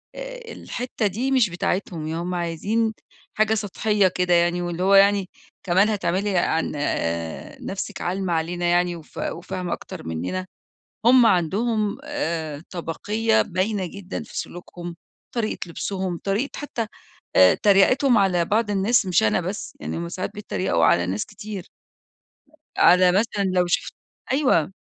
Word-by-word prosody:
آآ، -, -, -8 dB
الحتة 245 Hz, -3 st, -3 dB
دي 240 Hz, +8 st, -2 dB
مش 255 Hz, -6 st, +4 dB
بتاعتهم 175 Hz, -2 st, -2 dB
ي 160 Hz, -, -3 dB
هُم 175 Hz, +2 st, -3 dB
عايزين 200 Hz, +7 st, 0 dB, 0.4 s
حاجة 215 Hz, 0 st, +2 dB
سطحية 210 Hz, -1 st, +1 dB
كده، 180 Hz, -1 st, +1 dB
يعني 175 Hz, +1 st, +3 dB
واللي 175 Hz, 0 st, -3 dB
هو 195 Hz, +1 st, +4 dB
يعني 200 Hz, -1 st, +5 dB, 0.3 s
"كمان 190 Hz, +3 st, +3 dB
هتعملي 195 Hz, -1 st, 0 dB
عن 165 Hz, -1 st, +1 dB, 0.9 s
نَفسك 195 Hz, +1 st, -5 dB
عالمة 185 Hz, 0 st, -1 dB
علينا 175 Hz, +2 st, -1 dB
يعني 175 Hz, 0 st, +2 dB
وف 160 Hz, -, -13 dB
وفاهمة 180 Hz, 0 st, -3 dB
أكتر -, -, -8 dB
مننا؟!" 90 Hz, -, -3 dB, 0.6 s
هُم 245 Hz, -1 st, +7 dB
عندهم 210 Hz, +5 st, +1 dB
آآ، 165 Hz, -, -3 dB
طبقية 210 Hz, +6 st, 0 dB
باينة 190 Hz, +1 st, -1 dB
جدًا 200 Hz, +4 st, -6 dB
في 225 Hz, -, -7 dB
سلوكهم، 175 Hz, -1 st, -7 dB, 0.4 s
طريقة 225 Hz, -2 st, -1 dB
لبسُهم 185 Hz, 0 st, -3 dB
طريقة 205 Hz, +8 st, 0 dB
حتى 240 Hz, -6 st, -3 dB, 0.5 s
آآ، 95 Hz, 0 st, +7 dB
تَريَقِتهُم 225 Hz, +5 st, +4 dB
على 180 Hz, -3 st, +3 dB
بعض 210 Hz, +4 st, +1 dB
الناس 200 Hz, +2 st, +2 dB
مش 180 Hz, -, +3 dB
أنا 110 Hz, +10 st, +2 dB
بس 185 Hz, +4 st, -5 dB
يعني -, -, -4 dB
هُم 170 Hz, +1 st, -4 dB
ساعدات 185 Hz, +2 st, -4 dB
بيّتّريَقوا 185 Hz, -, 0 dB
على 85 Hz, +2 st, +4 dB
ناس 95 Hz, +3 st, -2 dB
كتير. 205 Hz, -4 st, -8 dB, 1.1 s
على 180 Hz, 0 st, +6 dB
مثلًا 200 Hz, +1 st, +1 dB
لو 180 Hz, -1 st, +2 dB
شُفت 175 Hz, -, -1 dB, 0.4 s
أيوه، 255 Hz, -, +2 dB
190 Hz, 140 wpm, -23 LUFS, 175-215 Hz, 1.1 s, هُم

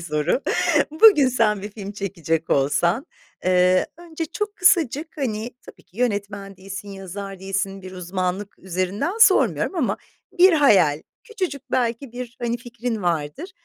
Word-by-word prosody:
soru. 155 Hz, -, 0 dB, 0.5 s
Bugün 310 Hz, -4 st, +6 dB
sen 215 Hz, -5 st, +1 dB
bir 205 Hz, -, -6 dB
film 200 Hz, -1 st, -8 dB
çekecek 170 Hz, -6 st, -3 dB
olsan, 150 Hz, -, +1 dB, 0.4 s
eee, 185 Hz, 0 st, +3 dB
önce 330 Hz, -1 st, -6 dB
çok 420 Hz, +6 st, -4 dB
kısacık, 330 Hz, -5 st, +3 dB
hani, 235 Hz, -5 st, -3 dB, 0.2 s
tabii -, -, -14 dB
ki 190 Hz, -, -27 dB
yönetmen 205 Hz, -4 st, -2 dB
değilsin, 195 Hz, +2 st, -8 dB
yazar 195 Hz, 0 st, -7 dB
değilsin. 195 Hz, 0 st, -3 dB
Bir 185 Hz, 0 st, -9 dB
uzmanlık 185 Hz, +2 st, -4 dB
üzerinden 190 Hz, -, -2 dB
sormuyorum 390 Hz, -, +4 dB
ama 305 Hz, -9 st, 0 dB, 0.4 s
bir 370 Hz, +1 st, +7 dB
hayal, 205 Hz, -, +4 dB, 0.2 s
küçücük 360 Hz, -, -5 dB
belki 240 Hz, 0 st, -1 dB
bir, 245 Hz, -1 st, -7 dB
hani, 235 Hz, 0 st, 0 dB
fikrin 235 Hz, -2 st, -5 dB
vardır. 175 Hz, -, -2 dB
205 Hz, 135 wpm, -22 LUFS, 185-270 Hz, 0.5 s, bir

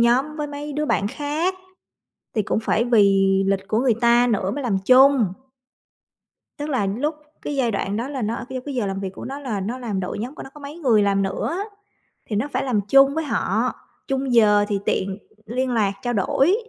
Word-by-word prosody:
nhóm 260 Hz, +6 st, +2 dB
với 300 Hz, -1 st, -2 dB
mấy 290 Hz, 0 st, -6 dB
đứa 300 Hz, +1 st, -1 dB
bạn 200 Hz, -7 st, +1 dB
khác, 300 Hz, -, -2 dB, 0.8 s
thì 215 Hz, -, +3 dB
cũng 215 Hz, -, 0 dB
phải 225 Hz, 0 st, +1 dB
vì 195 Hz, -4 st, +4 dB
lịch 195 Hz, 0 st, 0 dB
của 220 Hz, -, +1 dB
người 245 Hz, -3 st, +2 dB
ta 240 Hz, +1 st, +5 dB
nữa 200 Hz, -4 st, 0 dB
mới 285 Hz, +4 st, -4 dB
làm 215 Hz, -6 st, +1 dB
chung. 255 Hz, -5 st, +5 dB, 1.3 s
Tức 295 Hz, +1 st, -4 dB
là 255 Hz, -8 st, 0 dB
lúc 255 Hz, +11 st, -1 dB, 0.3 s
cái 290 Hz, -, -4 dB
giai 245 Hz, -4 st, +1 dB
đoạn 200 Hz, -1 st, -2 dB
đó 235 Hz, +4 st, -3 dB
là 275 Hz, -3 st, -4 dB
nó 220 Hz, +2 st, -1 dB
ở -, -, -5 dB
c -, -, -21 dB, 0.2 s
cái 285 Hz, -, -5 dB
giờ 240 Hz, -5 st, -1 dB
làm 195 Hz, 0 st, -3 dB
việc 195 Hz, -1 st, -4 dB
của -, -, -8 dB
nó 275 Hz, +2 st, -5 dB
là 230 Hz, -8 st, -3 dB
nó 230 Hz, +7 st, -3 dB
làm 215 Hz, -6 st, -3 dB
đội 180 Hz, +2 st, -4 dB
nhóm 250 Hz, +7 st, -5 dB
của -, -, -8 dB
nó 270 Hz, -, -10 dB
có 295 Hz, -, -12 dB
mấy 290 Hz, +4 st, -8 dB
người 235 Hz, -9 st, +3 dB
làm 200 Hz, -1 st, +2 dB
nữa, 195 Hz, -, -2 dB, 0.7 s
thì 215 Hz, -, -4 dB
nó 215 Hz, +8 st, 0 dB
phải 255 Hz, +2 st, 0 dB
làm 240 Hz, -6 st, +1 dB
chung 275 Hz, +2 st, +6 dB
với 320 Hz, -, 0 dB
họ, 295 Hz, -, 0 dB, 0.3 s
chung 270 Hz, -2 st, -1 dB
giờ 210 Hz, -3 st, +5 dB
thì 205 Hz, -2 st, -1 dB
tiện 190 Hz, 0 st, -1 dB, 0.3 s
liên 250 Hz, +3 st, -2 dB
lạc, 215 Hz, -4 st, +2 dB
trao 245 Hz, -1 st, -2 dB
đổi, 270 Hz, -, +2 dB
240 Hz, 225 wpm, -22 LUFS, 205-275 Hz, 1.3 s, chung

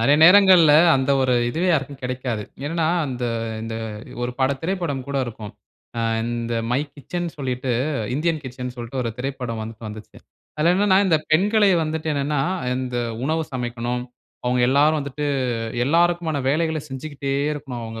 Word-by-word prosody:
நெறைய 140 Hz, +6 st, +4 dB
நேரங்கள்ல, 180 Hz, -4 st, +8 dB, 0.2 s
அந்த 135 Hz, +1 st, 0 dB
ஒரு 130 Hz, -1 st, +2 dB, 0.2 s
இதுவே 175 Hz, +8 st, 0 dB
யாருக்கும் 140 Hz, -4 st, -1 dB
கெடை 125 Hz, 0 st, -2 dB
க்காது. 120 Hz, -4 st, -3 dB, 0.2 s
என்னன்னா, 165 Hz, +2 st, 0 dB, 0.2 s
அந்த 125 Hz, -2 st, -4 dB, 0.4 s
இந்த 115 Hz, 0 st, -5 dB, 0.5 s
ஒரு 120 Hz, -, -1 dB
பட 130 Hz, +1 st, +3 dB
திரைப்படம் 170 Hz, -7 st, -2 dB
கூட 140 Hz, -, -2 dB
இருக்கும். 110 Hz, -3 st, -8 dB, 0.5 s
ஆ -, -, 0 dB, 0.2 s
இந்த 120 Hz, 0 st, -2 dB, 0.2 s
மை 125 Hz, -, +2 dB, 0.2 s
கிச்சன்ன்னு 170 Hz, +4 st, -5 dB
சொல்லிட்டு, 130 Hz, -1 st, -2 dB, 0.4 s
INDIAN 160 Hz, +3 st, +1 dB
KITCHENன்னு 125 Hz, -1 st, -6 dB
சொல்ட்டு, 120 Hz, +2 st, -7 dB
ஒரு 115 Hz, -, -2 dB
திரைப்படம் 125 Hz, -4 st, -4 dB
வந்துட்டு 110 Hz, +1 st, -8 dB
வந்துச்சு. 105 Hz, 0 st, -10 dB, 0.4 s
அதில 165 Hz, +3 st, +3 dB
என்னான்னா, 190 Hz, 0 st, +4 dB
இந்த 165 Hz, -, +4 dB
பெண்களை 205 Hz, +5 st, +4 dB
வந்துட்டு 160 Hz, 0 st, -3 dB
என்னான்னா, 145 Hz, 0 st, 0 dB, 0.4 s
இந்த 125 Hz, -1 st, -3 dB, 0.3 s
உணவு 160 Hz, +3 st, 0 dB
சமைக்கனும். 120 Hz, 0 st, -3 dB, 0.4 s
அவுங்க 125 Hz, 0 st, +2 dB
எல்லாரும் 150 Hz, +3 st, +4 dB
வந்துட்டு, 140 Hz, +1 st, -4 dB, 0.6 s
எல்லாருக்குமான 170 Hz, 0 st, +2 dB
வேலைகள 160 Hz, +2 st, +1 dB
செஞ்சுக்கிட்டே 140 Hz, 0 st, -4 dB, 0.2 s
இருக்கனும். 135 Hz, -5 st, -6 dB
அவுங்க 115 Hz, 0 st, -7 dB
140 Hz, 150 wpm, -22 LUFS, 125-160 Hz, 0.6 s, நேரங்கள்ல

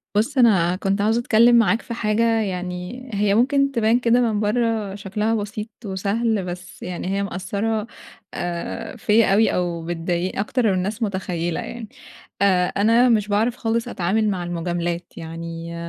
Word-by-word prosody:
بُص، 230 Hz, +7 st, +1 dB
أنا 190 Hz, -8 st, +4 dB
كنت 195 Hz, +1 st, -1 dB
عاوزة 220 Hz, +3 st, +2 dB
أتكلِّم 235 Hz, +1 st, +5 dB
معاك 230 Hz, 0 st, +4 dB
في 235 Hz, -, -7 dB
حاجة، 215 Hz, 0 st, 0 dB, 0.2 s
يعني 180 Hz, +5 st, -5 dB
هي 205 Hz, 0 st, +2 dB
ممكن 275 Hz, +4 st, +3 dB
تبان 230 Hz, -1 st, +2 dB
كده 240 Hz, 0 st, +3 dB
من 220 Hz, -4 st, +1 dB
برَّه 215 Hz, -2 st, 0 dB
شكلها 210 Hz, +3 st, -1 dB
بسيط 210 Hz, +1 st, -4 dB, 0.2 s
وسهل، 200 Hz, +2 st, -1 dB
بس 180 Hz, +1 st, -8 dB
يعني 180 Hz, 0 st, -5 dB
هي 195 Hz, +1 st, 0 dB
مأثَّرة 200 Hz, +4 st, -2 dB, 0.5 s
آآ 175 Hz, +7 st, -4 dB
فيا 215 Hz, -2 st, +3 dB
أوي 220 Hz, +3 st, +3 dB
أو 170 Hz, -2 st, -2 dB
بتضايق 175 Hz, +2 st, -2 dB
أكتر 240 Hz, +5 st, 0 dB
من 200 Hz, -, +3 dB
الناس 200 Hz, +5 st, -2 dB
مُتخيِّلة 180 Hz, -4 st, -2 dB
يعني، 235 Hz, -3 st, -7 dB, 0.5 s
آآ 185 Hz, -3 st, +4 dB
أنا 230 Hz, +6 st, +3 dB
مش 215 Hz, -3 st, +2 dB
باعرف 220 Hz, +4 st, +1 dB
خالص 230 Hz, 0 st, -1 dB
أتعامل 215 Hz, +1 st, 0 dB
مع 185 Hz, -3 st, -2 dB
المجاملات، 175 Hz, 0 st, -3 dB
يعني 165 Hz, +1 st, -7 dB
205 Hz, 155 wpm, -22 LUFS, 180-225 Hz, 0.5 s, أتكلِّم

